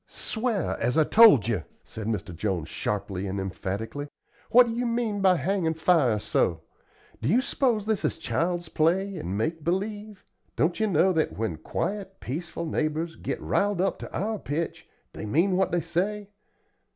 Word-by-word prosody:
"Sw'ar, 220 -5 -2
as 125 +6 0
I 160 - +6
told 200 - +7
you," 105 -9 0 0.2
said 110 -1 -7
Mr. 100 -6 -3
Jones, 90 -3 -2
sharply 100 0 -3
and 95 +1 -3
emphatically. 100 +8 -4 0.4
"What 245 +1 +7
do 230 - -3
you 240 +1 -1
mean 230 -3 -1
by 190 -2 +5
hangin' 165 +1 0
fire 160 -9 +3
so? 85 -5 0 0.6
Do 115 - 0
you 225 +9 +5
s'pose 245 -5 0
this 215 -3 0
is - - 0
child's 175 +1 -1
play 180 +5 +1
and 100 - -3
make 155 +8 -2
believe? 205 +4 -3 0.3
Don't 170 +6 +1
ye 220 - +2
know 185 0 +3
that 155 - 0
when 105 -7 -2
quiet, 195 - -4
peaceable 170 +5 -5
neighbors 155 +1 -1
git - - -4
riled 205 -2 0
up 190 +1 0
to - - -8
our 215 +1 -2
pitch, 160 +2 -4 0.2
they - - -6
mean 175 - +2
what 190 +1 +1
they 175 - +1
say? 205 +5 -2
170 Hz, 170 wpm, -26 LUFS, -, 0.6 s, told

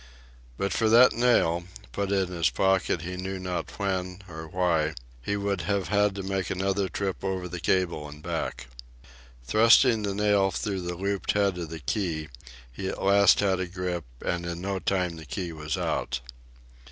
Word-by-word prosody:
But 100 -2 -1
for 110 -1 +2
that 120 +3 +7
nail, 85 -8 +2 0.3
put 100 +7 -2
in 95 -2 +1
his 85 -5 +1
pocket 95 +2 +1
he 90 +1 -5
knew 95 +1 -4
not 90 -1 -4
when 95 -1 -2
or 80 -2 -8
why, 80 -3 +1 0.3
he 100 +11 -1
would 100 -2 -1
have 100 -2 0
had 105 -1 +2
to 100 - -4
make 95 -1 -2
another 95 +1 0
trip 95 -2 -3
over 95 -2 -2
the 90 0 -6
cable 85 -3 0
and 75 +1 -12
back. - - -3 0.8
Thrusting 115 - +5
the 100 -1 -2
nail 100 -1 +3
through 95 -1 -3
the 90 0 -4
looped 100 +2 -1
head 100 -3 +1
of 85 -2 -5
the 80 - -6
key, 80 - -2 0.4
he 95 +10 -5
at - - -4
last 100 0 +5
had 95 -2 +2
a 95 - -2
grip, 90 -2 -3 0.2
and 85 0 -1
in 85 0 -4
no 95 +1 -2
time 90 -3 -1
the 80 - -10
key 90 -1 -4
was 75 -1 -4
out. - - -1
95 Hz, 180 wpm, -27 LUFS, 85-100 Hz, 0.8 s, that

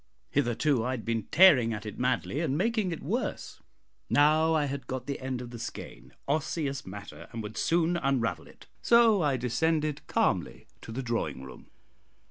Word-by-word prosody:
Hitherto 135 -1 +1
I 125 - -2
had 115 - -9
been 115 -3 -1
tearing 140 -11 +6
at 105 +1 -8
it 105 - -7
madly 125 +3 0
and 155 -4 0
making 215 0 0
it 165 - -6
worse; 230 - -3 0.5
now 155 +2 +4
I 150 -2 +2
had 135 -3 -5
got 130 -1 -4
the 140 0 -4
end 130 -1 -4
of 120 - -9
the 120 - -8
skein 65 - -8 0.2
"osseous 140 - -2
matter" 100 +2 -9
and 115 -1 -5
would 105 +1 -7
soon 170 +1 +1
unravel 135 -7 -1
it. - - -17 0.2
So 230 -4 +5
I 145 -4 +1
descended 150 +4 0
calmly - - 0 0.2
to - - -9
the 130 +4 -4
drawing 115 - -2
room. 65 - -12
135 Hz, 175 wpm, -28 LUFS, 120-160 Hz, 0.5 s, tearing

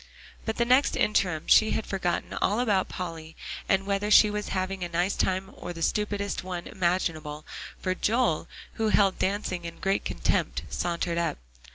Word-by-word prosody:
By 220 - +1
the 235 - +1
next 255 +3 +4
interim 190 -7 +1
she 220 - +5
had 220 - -4
forgotten 185 -3 -2
all 205 +4 +2
about 205 -6 +1
Polly 165 -3 -6 0.3
and 195 0 +3
whether 200 +1 0
she 210 0 +7
was 210 0 -3
having 185 0 -2
a 175 - -3
nice 175 +3 0
time 190 +1 0
or 175 - -7
the 165 -1 -5
stupidest 205 0 -1
one 180 -1 -5
imaginable, 165 -4 -1 0.3
for 185 - 0
Joel, 195 -5 +1 0.3
who 220 - +3
held 200 -2 +3
dancing 190 -2 -1
in 170 0 -7
great 195 +1 0
contempt, - - -1
sauntered 170 0 -1
up. 170 -2 -1
190 Hz, 170 wpm, -27 LUFS, 175-205 Hz, 0.3 s, she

